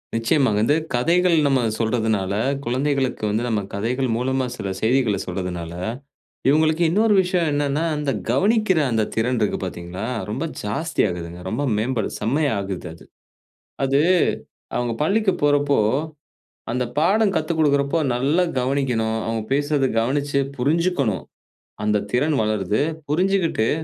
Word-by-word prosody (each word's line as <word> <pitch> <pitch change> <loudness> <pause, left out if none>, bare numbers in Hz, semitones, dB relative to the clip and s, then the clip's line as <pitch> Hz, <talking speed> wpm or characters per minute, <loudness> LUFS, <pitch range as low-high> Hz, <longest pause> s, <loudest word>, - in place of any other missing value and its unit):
நிச்சயமா 115 +3 +2
வந்து, 115 +8 +3 0.2
கதைகள் 170 +8 +3
நம்ம 135 -3 +3 0.2
சொல்றதனால, 110 -4 0 0.3
குழந்தைகளுக்கு 130 0 -1
வந்து, 110 +3 0
நம்ம 110 -3 0
கதைகள் 125 +6 -1
மூலமா, 130 +1 0
சில 100 - -4
செய்திகள 115 -3 +2
சொல்றதனால, 90 -2 -4 0.8
இவுங்களுக்கு 155 +3 +3
இன்னொரு 210 +5 +3
விஷயம் 180 -3 0
என்னனா, 145 +1 0
அந்த 150 -2 -1 0.2
கவனிக்கிற 195 - +3
அந்த 110 -1 +2
திறன் 120 +2 +1
இருக்கு 105 -2 0
பாத்தீங்களா, 90 +2 -5 0.2
ரொம்ப 130 +9 -2 0.2
ஜாஸ்தி 160 +11 -1
ஆகுதுங்க. 85 -1 -6
ரொம்ப 125 +8 -2
மேம்படு, 115 0 -1
செம்மையா 140 +7 +1
ஆகுது 95 -2 -5
அது. - - -15 0.8
அது, 135 +1 +2 0.8
அவுங்க 120 -1 -1
பள்ளிக்கு 200 +4 +2
போறப்போ, 145 -1 +3 1.0
அந்த 125 0 0
பாடம் 200 +4 +3
கத்துக்கொடுக்கிறப்போ, 155 -1 +1 0.2
நல்லா 145 +8 +2
கவனிக்கணும். 125 -4 0
அவுங்க 115 -1 -2
பேசுறத, 145 -1 +1
கவனிச்சு 140 +3 0 0.2
புரிஞ்சுக்கணும். 140 - +1 0.6
அந்த 105 -1 +1
திறன் 145 +4 +2
வளருது. 105 +1 0 0.3
புரிஞ்சுகிட்டு, 170 - +1
130 Hz, 120 wpm, -22 LUFS, 110-150 Hz, 1.0 s, வந்து